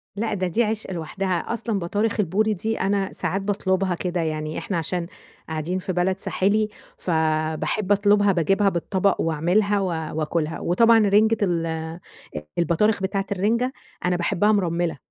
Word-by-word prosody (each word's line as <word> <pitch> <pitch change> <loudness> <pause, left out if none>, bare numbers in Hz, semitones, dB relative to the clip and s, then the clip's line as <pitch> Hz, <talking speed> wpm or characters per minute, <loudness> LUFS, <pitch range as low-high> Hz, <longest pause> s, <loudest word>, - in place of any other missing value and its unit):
لأ، 220 +2 -1
ده 185 -2 -1
دي 220 +7 +1
عشق 215 -2 -2
لوحدها. 180 +3 -2
أصلًا 230 -3 -2
بطارخ 205 +5 -1
البوري 210 +3 +2
دي، 220 +3 -2
أنا 195 0 0
ساعات 195 +2 -2
باطلبها 195 -2 0
كده، 175 0 -2
يعني 155 -1 -3
إحنا 190 - -3
عشان 170 +1 -2 0.4
قاعدين 160 +4 -2
في 185 0 -3
بلد 185 +2 0
ساحلي 210 +3 +1 0.3
فباحب 160 +3 0
أطلبها، 205 0 +4
باجيبها 195 +3 +2
بالطبق 190 +2 0
وأعملها 180 +6 +1
و 195 - 0 0.3
وآكلها. 160 0 -1
وطبعًا 225 +6 +4
رنجة 215 +2 +4
ال 165 -3 -1 0.6
البطارخ 180 +5 +2
بتاعة 195 +1 -1
الرنجة، 230 +7 +1 0.3
أنا 180 0 +2
باحبها 175 +4 +2
مرملّة، 175 -5 0
190 Hz, 145 wpm, -23 LUFS, 170-205 Hz, 0.6 s, أطلبها